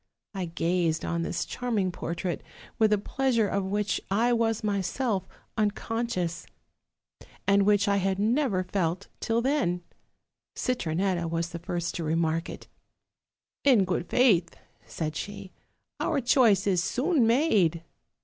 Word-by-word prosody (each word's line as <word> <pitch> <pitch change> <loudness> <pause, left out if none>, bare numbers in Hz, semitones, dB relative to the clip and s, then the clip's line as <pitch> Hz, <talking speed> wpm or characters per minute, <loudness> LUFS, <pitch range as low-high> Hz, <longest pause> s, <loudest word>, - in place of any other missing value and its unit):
I 190 -2 -3
gazed 165 -1 0
on 170 0 -1
this 170 +1 -2
charm 245 -3 -3
ing 185 -2 +1
portrait 175 0 -4 0.4
with 220 -1 +4
a 210 - +4
pleasure 230 +1 +1
of 200 0 -1
which 205 0 -1
I 230 +5 +2
was 225 -2 +1
myself 200 0 -1 0.3
uncon 225 +3 -1
scious 175 -6 -3 1.0
and 200 0 +4
which 205 -1 +4
I 200 0 +3
had 190 0 0
never 220 -2 +1
felt 180 0 -2
till 230 +1 0
then. 245 -11 0 0.7
Citronetta 180 -6 -1
was 165 +1 -1
the 170 0 -6
first 175 -1 -3
to 170 - -4
remark 165 +1 0
it. - - -9 1.0
'In 245 -9 +5
good 175 -1 -2
faith, 200 -10 +3 0.3
'said 155 -2 -4
she, 200 0 -6 0.5
'our 310 -4 +1
choice 235 -6 +4
is 185 -3 +2
soon 270 - +2
made.' 210 - +3
195 Hz, 140 wpm, -27 LUFS, 175-230 Hz, 1.0 s, In